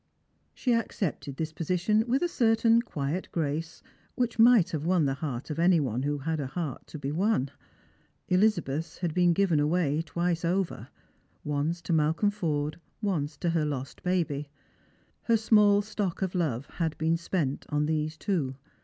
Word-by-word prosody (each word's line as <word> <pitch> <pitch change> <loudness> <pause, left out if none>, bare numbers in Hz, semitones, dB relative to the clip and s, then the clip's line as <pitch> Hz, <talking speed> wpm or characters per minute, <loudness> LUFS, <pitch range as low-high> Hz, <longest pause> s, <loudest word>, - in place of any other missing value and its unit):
She 250 - +1
accepted 185 - -2
this 160 -1 -3
position 185 +7 +1
with 265 +6 +1
a - - +3
certain 230 -5 +3
quiet 150 -3 -3
grace 160 0 -3 0.3
which 245 -3 -1
might 230 -5 +6
have 155 -3 -2
won 175 -2 +2
the 135 - +1
heart 135 -1 -5
of 150 - -4
any 175 0 +5
one 125 -4 -1
who 145 +2 -1
had 160 +3 -2
a 140 - -2
heart 150 -1 -5
to - - -8
be 140 -1 -4
won. 165 - +1 0.8
Elizabeth's 170 -6 +1
had 175 -3 -2
been 175 0 +4
given 170 -3 +2
away 150 0 +1
twice 170 +1 -1
over, 180 +2 -1 0.6
once 150 +4 -1
to 170 - -1
Malcolm 160 +6 +2
Forde, 155 -6 -2 0.2
once 155 -8 -2
to 170 - 0
her 165 -2 +1
lost 140 -3 -4
baby. 155 -6 -1 0.7
Her 230 -1 +3
small 210 -2 +4
stock 200 -3 -3
of 185 - -2
love 145 -8 -1
had 160 -2 -3
been 160 +1 +1
spent 165 -5 -2
on 150 0 +1
these 155 0 -1
two. 155 -11 -1
165 Hz, 165 wpm, -28 LUFS, 150-190 Hz, 0.8 s, might